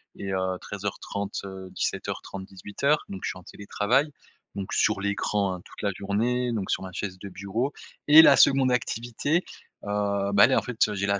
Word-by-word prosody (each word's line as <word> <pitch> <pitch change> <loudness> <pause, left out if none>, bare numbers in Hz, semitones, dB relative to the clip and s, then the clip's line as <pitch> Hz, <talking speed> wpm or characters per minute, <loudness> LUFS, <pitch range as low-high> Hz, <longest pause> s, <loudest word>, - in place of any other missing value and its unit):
et, 95 -1 -5
heu, 95 0 -1
13:30 100 0 -5
heu, 95 -1 -8
17:30-18:00. 100 +9 -2
Donc 95 -1 -7
je - - -1
suis - - -6
en - - -16
télétravail, 120 - 0 0.4
donc 100 -1 -5
sur 105 -2 +2
l'écran, 100 -1 0
hein, 90 - -10
toute - - -12
la 100 - +1
journée, 120 +5 0
donc 100 -4 -3
sur - - -1
ma 95 - -7
chaise 95 -2 -4
de 100 - -8
bureau. 105 +9 -3 0.3
Et 150 +2 +10
la 145 -4 +7
seconde 135 -2 +5
activité, 125 +7 -1 0.4
heu, 100 -1 -1
bah 100 - +8
elle 130 - +1
est - - +4
en - - +3
fait, 110 -4 0
j'ai 100 0 -2
la 100 0 +1
100 Hz, 190 wpm, -26 LUFS, 100-125 Hz, 0.4 s, Et